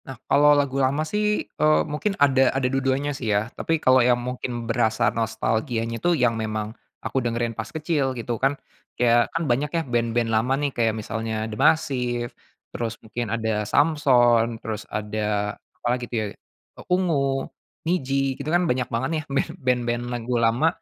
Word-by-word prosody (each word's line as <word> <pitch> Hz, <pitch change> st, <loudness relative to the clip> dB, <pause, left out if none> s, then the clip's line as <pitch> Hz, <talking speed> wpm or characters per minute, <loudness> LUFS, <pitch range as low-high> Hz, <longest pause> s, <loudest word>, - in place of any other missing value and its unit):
Nah, 135 Hz, -2 st, -8 dB
kalau 145 Hz, +1 st, +5 dB
lagu 140 Hz, -1 st, +1 dB
lama 140 Hz, +4 st, +1 dB
sih, 210 Hz, +5 st, 0 dB
eee, 155 Hz, 0 st, +2 dB
mungkin 195 Hz, +7 st, -2 dB
ada 135 Hz, -2 st, +4 dB
ada 135 Hz, -, 0 dB
dua-duanya 135 Hz, +2 st, 0 dB
sih 130 Hz, -5 st, -4 dB
ya. 105 Hz, +3 st, 0 dB
Tapi 165 Hz, -, -1 dB
kalau 130 Hz, -4 st, +4 dB
yang 120 Hz, 0 st, +4 dB
mungkin 120 Hz, -1 st, -4 dB
berasa 115 Hz, -1 st, +1 dB
nostalgianya 115 Hz, +1 st, -1 dB
itu 175 Hz, -1 st, +2 dB
yang 120 Hz, -2 st, +3 dB
memang 110 Hz, 0 st, -3 dB, 0.3 s
aku 130 Hz, -, 0 dB
dengerin 120 Hz, -1 st, -1 dB
pas 110 Hz, -1 st, -6 dB
kecil, 150 Hz, -5 st, -1 dB
gitu 120 Hz, -1 st, -4 dB
kan. 135 Hz, +2 st, +2 dB, 0.4 s
Kayak, 120 Hz, -1 st, +3 dB
kan 165 Hz, -, -1 dB
banyak 140 Hz, +3 st, +1 dB
ya, -, -, +2 dB
band-band 120 Hz, -1 st, 0 dB
lama 115 Hz, +4 st, +2 dB
nih, 145 Hz, 0 st, 0 dB
kayak 115 Hz, -2 st, +1 dB
misalnya 110 Hz, 0 st, -3 dB
D'Masiv 120 Hz, 0 st, +1 dB, 0.4 s
terus 115 Hz, -1 st, -3 dB
mungkin 120 Hz, +2 st, -4 dB
ada 110 Hz, -1 st, -1 dB
Samson, 120 Hz, -5 st, +3 dB
terus 110 Hz, -1 st, -5 dB
ada 105 Hz, -1 st, -2 dB, 0.3 s
apa -, -, -3 dB
lagi 125 Hz, -1 st, -4 dB
itu -, -, -5 dB
ya, -, -, -2 dB
eee, -, -, -20 dB
Ungu, 145 Hz, -7 st, +1 dB, 0.4 s
Nidji, 135 Hz, -5 st, 0 dB
itu 145 Hz, -, -4 dB
kan 175 Hz, +2 st, +3 dB
banyak 125 Hz, -1 st, 0 dB
banget 120 Hz, +3 st, 0 dB
nih, 155 Hz, -, 0 dB
band 140 Hz, 0 st, 0 dB
band-band 120 Hz, -1 st, +1 dB
lagu 120 Hz, +1 st, -3 dB
lama 115 Hz, +7 st, +3 dB
125 Hz, 170 wpm, -24 LUFS, 115-140 Hz, 0.4 s, kalau